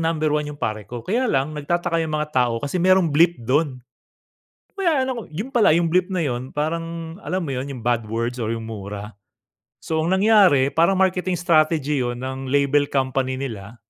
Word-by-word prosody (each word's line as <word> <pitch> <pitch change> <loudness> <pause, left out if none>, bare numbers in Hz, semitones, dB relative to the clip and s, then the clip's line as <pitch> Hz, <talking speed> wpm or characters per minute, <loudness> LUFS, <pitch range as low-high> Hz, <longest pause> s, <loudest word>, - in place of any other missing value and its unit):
number 160 -2 0
1 150 0 0
yung 145 - -7
"Pare 110 -2 -3
Ko". 120 0 -6
Kaya 240 +7 0
lang 135 0 0
nagtataka 165 +3 -1
yung 160 -1 -2
mga 150 0 -2
tao 125 -3 +1
kasi 145 +6 -2
merong 185 -2 +4
bleep 170 +3 +4
dun, 135 +2 0 0.9
'no - - -50
kaya 330 -8 +2
'no 250 -4 -4
yun 200 - -6
pala 235 -3 +4
yung 170 -1 +1
bleep 180 0 +3
na 185 -3 -1
yun, 125 0 -3
parang 165 +2 -3
alam 185 +1 -3
mo 145 - -4
yun 130 +1 -3
yung 130 -4 -7
bad 120 -2 0
words 115 +3 -2
or 110 - -2
yung 115 - -6
mura. 105 -1 -7 0.7
So, 160 -1 -1
ang 165 +4 +1
nangyari 190 -10 +5
parang 170 +4 +3
marketing 185 -1 +1
strategy 155 -4 +2
yun 120 0 -3
ng 130 0 -5
label 140 +1 +2
company 130 -1 -1
nila. 115 -5 -6
150 Hz, 195 wpm, -22 LUFS, 130-175 Hz, 0.9 s, nangyari